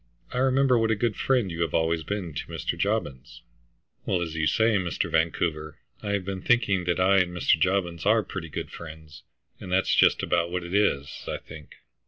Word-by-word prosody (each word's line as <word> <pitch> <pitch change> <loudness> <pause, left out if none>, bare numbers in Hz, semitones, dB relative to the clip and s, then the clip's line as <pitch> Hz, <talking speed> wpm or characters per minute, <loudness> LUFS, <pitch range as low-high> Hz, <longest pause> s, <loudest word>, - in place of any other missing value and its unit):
I 125 - -1
remember 130 -1 +3
what 115 0 +1
a 110 - +3
good 110 0 -1
friend 125 -8 +1
you 85 0 -4
have 85 -3 0
always 80 0 +1
been 90 -1 -4
to 75 - -5
Mr. 80 0 -3
Jobbins." 85 - -3 0.6
"Well, 90 - 0
as 80 -2 -5
you 80 -1 0
say, 110 +3 +3
Mr. 90 -4 -2
Vancouver, 80 -1 -1 0.2
I 100 -1 -2
have 100 -2 -1
been 95 -1 -4
thinking 100 -6 +2
that 90 +1 0
I 95 +2 +4
and 90 -1 +1
Mr. 80 - +3
Jobbins 90 -2 0
are 110 +2 +3
pretty 85 -5 -7
good - - -5
friends, 80 -2 -11 0.4
and 90 - -8
that's 95 +1 +2
just - - +4
about 85 0 +1
what 90 0 -3
it 85 +1 -7
is, 85 -9 0
I - - -2
think." 80 -2 -13
90 Hz, 205 wpm, -26 LUFS, 80-100 Hz, 0.6 s, I